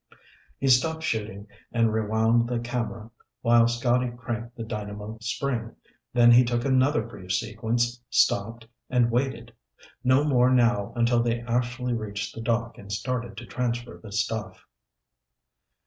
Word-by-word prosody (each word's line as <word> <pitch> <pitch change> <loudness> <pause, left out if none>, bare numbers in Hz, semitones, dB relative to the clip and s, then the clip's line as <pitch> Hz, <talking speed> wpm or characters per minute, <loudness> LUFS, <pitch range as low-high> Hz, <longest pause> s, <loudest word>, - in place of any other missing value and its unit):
He 135 - -1
stopped 160 +6 +3
shooting 105 -5 -3 0.3
and 115 -2 +2
rewound 110 +2 +2
the 125 - 0
camera 115 -2 -4 0.3
while 115 0 +5
Scotty 120 +1 +1
cranked 120 -1 -6
the 115 - -5
dynamo 105 0 -6
spring, 115 0 -3 0.4
then 120 -1 +6
he 120 +1 +8
took 120 0 -1
another 130 0 +3
brief 95 -6 -6
sequence, 115 +4 -1
stopped, 115 -1 +1 0.2
and 120 -2 +2
waited. 120 -2 -2 0.5
No 130 +3 +4
more 125 -4 +4
now 120 -5 +2
until 120 0 +3
they 120 0 0
actually 125 +1 -1
reached 105 -2 -4
the 115 - -7
dock 115 0 -1
and 100 0 -10
started 120 +3 -3
to - - -7
transfer 120 -1 -3
the 110 - -11
stuff. 105 +1 -3
120 Hz, 140 wpm, -26 LUFS, 110-125 Hz, 0.5 s, he